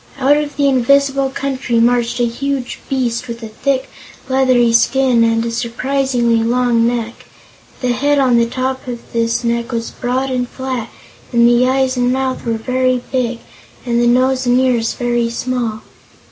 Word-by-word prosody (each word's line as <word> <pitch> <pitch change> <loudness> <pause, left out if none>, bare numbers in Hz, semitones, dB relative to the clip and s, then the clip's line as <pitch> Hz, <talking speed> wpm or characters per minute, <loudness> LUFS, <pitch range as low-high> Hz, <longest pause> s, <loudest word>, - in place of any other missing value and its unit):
Out 275 +2 +3
of 295 -1 -2
the 285 -1 +2
invisible 275 +1 +2
country 265 -3 -2
marched 240 0 +1
a 240 - +3
huge 260 +2 -3
beast 250 -3 -1
with 235 0 -7
a - - -5
thick, 265 +4 -1 0.4
leathery 255 -3 +3
skin 250 0 +3
and 230 0 +1
a 230 - -2
surprisingly 240 0 0
long 235 -1 +2
neck. 235 -1 -4 0.6
The 250 - -1
head 285 +4 +1
on 255 -3 +3
the 235 - +2
top 260 +2 -3
of 240 -1 -8
this 230 +1 0
neck 235 0 -1
was 230 -1 -3
broad 255 +2 -2
and 250 -1 -2
flat 260 -4 -4 0.4
and 235 0 +4
the 240 +1 +4
eyes 260 -1 +1
and 245 0 +2
mouth 260 0 -2
were 230 - +1
very 255 +2 0
big 245 -2 -1 0.4
and 235 -1 +1
the 240 - +3
nose 255 +1 +2
and 245 +1 +4
ears 245 -3 +1
very 240 -1 0
small. 235 -2 -3
245 Hz, 170 wpm, -16 LUFS, 235-260 Hz, 0.6 s, and